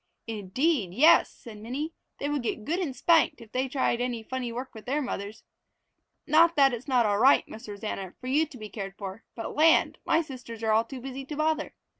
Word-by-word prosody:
"Indeed 220 - -1
yes!" 310 +8 +6
said 220 -3 -12
Minnie. 270 +9 -4 0.2
"They 285 - -3
would 290 -1 -1
get 220 -2 -3
good 340 +4 -1
and 305 -9 -3
spanked 330 -3 +3
if 225 -2 -14
they 260 +1 0
tried 250 -3 0
any 245 -2 -2
funny 250 0 -4
work 250 +3 -6
with 220 0 -12
their 280 +4 +1
mothers. 215 -6 -5 0.8
Not 330 +3 +5
that 275 -3 +5
it's 240 +3 -6
not 250 -4 +3
all 205 -1 +1
right, 265 +4 +5
Miss 220 0 -10
Rosanna, 200 -2 -5
for - - -12
you 295 +5 +2
to 280 - -12
be 215 -2 -7
cared 195 -1 -7
for, 200 +2 -7
but 225 - -6
land, 320 +2 +4
my 330 - +2
sisters 245 -6 -9
are 220 - +2
all 220 +1 +3
too 255 +1 -8
busy 270 +1 -6
to 295 - -6
bother! 310 +1 -1
250 Hz, 215 wpm, -27 LUFS, 220-290 Hz, 0.8 s, yes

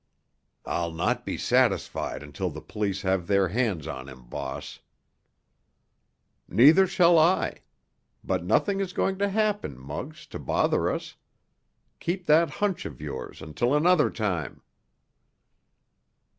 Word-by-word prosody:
"I'll 85 -1 -2
not 80 +1 -1
be - - -2
satisfied - - 0
until 75 +6 -4
the 80 -1 -8
police 100 +1 -3
have 95 -2 0
their 100 -2 +3
hands 105 - -1
on 70 -4 -6
him, 65 -1 -13
boss." 65 +2 -6 1.7
"Neither 160 +10 +6
shall 175 -2 +5
I. 170 +4 +2 0.6
But - - -1
nothing 200 -1 +1
is 190 -2 -2
going 190 0 0
to 200 0 +1
happen, 210 - -1
Muggs, 65 +2 -7
to - - -5
bother - - +1
us. - - -5 0.8
Keep 180 +1 -3
that 160 +2 +5
hunch 205 -3 -2
of 70 - -11
yours - - -7
until 120 - 0
another 165 +1 +4
time." 95 -8 -3
110 Hz, 125 wpm, -26 LUFS, -, 1.7 s, Neither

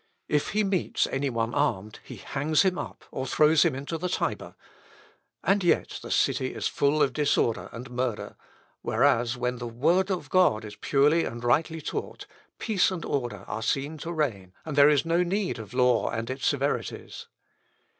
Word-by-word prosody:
If 150 -1 +1
he 215 +1 +2
meets 195 -3 0
any 135 +1 -1
one 115 -1 -2
armed 110 -8 -1
he - - -9
hangs 150 +4 0
him 185 -2 +1
up, - - -7
or 130 - -4
throws 150 +3 +4
him 165 -6 +1
into 140 +5 -5
the 180 +2 -2
Tiber; - - -3 0.9
and 195 0 +2
yet 175 - +1
the - - -9
city - - +1
is - - -1
full 145 +2 +2
of 130 - 0
disorder 140 -6 +1
and 125 +3 -9
murder, 125 -3 -3 0.5
whereas, 120 +1 +2
when 125 0 -2
the 120 - -4
word 165 - +1
of 175 -7 -3
God 145 -13 +3
is 105 -1 -9
purely 145 +8 +3
and 120 0 -6
rightly 160 +6 +1
taught, - - -5 0.3
peace 215 -5 +2
and 185 -3 -5
order 120 -8 -3
are 110 +2 -4
seen 140 +7 -1
to 165 - -5
reign, 110 - -2
and 155 -3 -4
there 145 +1 +7
is 150 +1 +2
no 165 +1 +2
need 185 - -1
of 110 - -9
law 125 -2 +3
and 115 +3 -3
its 130 0 -2
severities." 140 0 -2
140 Hz, 180 wpm, -27 LUFS, 120-165 Hz, 0.9 s, there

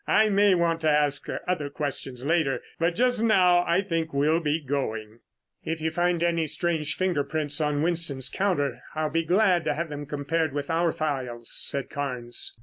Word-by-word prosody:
I 215 0 +4
may 200 -1 +4
want 165 -1 +1
to 155 - +2
ask 150 -1 +3 0.2
other 155 -6 -1
questions 135 -3 -4
later, 160 -4 +1 0.2
but 170 +1 +1
just 245 -1 +2
now 180 -6 +4
I 175 +3 +2
think 165 -4 -2
we'll 150 +4 +3
be 155 -1 0
going." 115 -6 -4 0.4
"If 165 0 -3
you 160 +1 -1
find 175 0 +1
any 170 -2 +1
strange 155 0 -1
finger 180 -6 0
prints 150 0 -2
on 150 -1 0
Winston's 160 -6 0
counter, 145 -11 -1
I'll 155 -1 -1
be 165 +1 +1
glad 180 0 +3
to 150 -1 0
have 165 +1 -3
them 145 -1 -6
compared 150 +1 -1
with 145 +1 -3
our 165 0 +2
files," 130 -7 -4
said 140 -1 -1
Carnes. 125 -4 -3
155 Hz, 180 wpm, -26 LUFS, 145-170 Hz, 0.4 s, I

